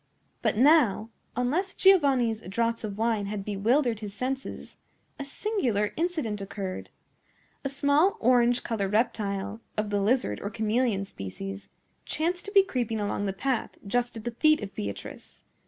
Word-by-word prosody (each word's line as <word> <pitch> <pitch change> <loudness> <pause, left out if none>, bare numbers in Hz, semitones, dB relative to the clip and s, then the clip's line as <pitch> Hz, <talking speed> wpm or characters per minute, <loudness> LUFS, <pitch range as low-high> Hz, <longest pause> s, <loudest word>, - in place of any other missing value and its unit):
But - - +1
now, 245 -5 +4 0.2
unless 310 +11 0
Giovanni's 270 - +4
draughts 230 +5 -1
of 205 -2 -4
wine 220 -2 0
had 200 -1 -4
bewildered 225 +4 +1
his 205 -2 -7
senses, 265 +4 -4 0.4
a - - -3
singular 275 - -1
incident 310 - -1
occurred. 195 -1 -5 0.7
A 275 - -1
small 285 +6 +3
orange 245 0 +3
colored 205 -3 -2
reptile, 210 -1 -1 0.2
of 210 -1 -1
the 205 -1 +1
lizard 210 - +1
or 200 - -3
chameleon 220 -1 0
species, 195 - -7 0.3
chanced 350 +3 -1
to 405 - -6
be 395 -2 +7
creeping 240 - -2
along 205 0 -1
the - - 0
path, 240 +5 -2
just 240 +3 -1
at 220 - -8
the 240 - -3
feet 305 +2 +3
of 195 - -6
Beatrice. 100 -1 -7
230 Hz, 150 wpm, -27 LUFS, 205-270 Hz, 0.7 s, be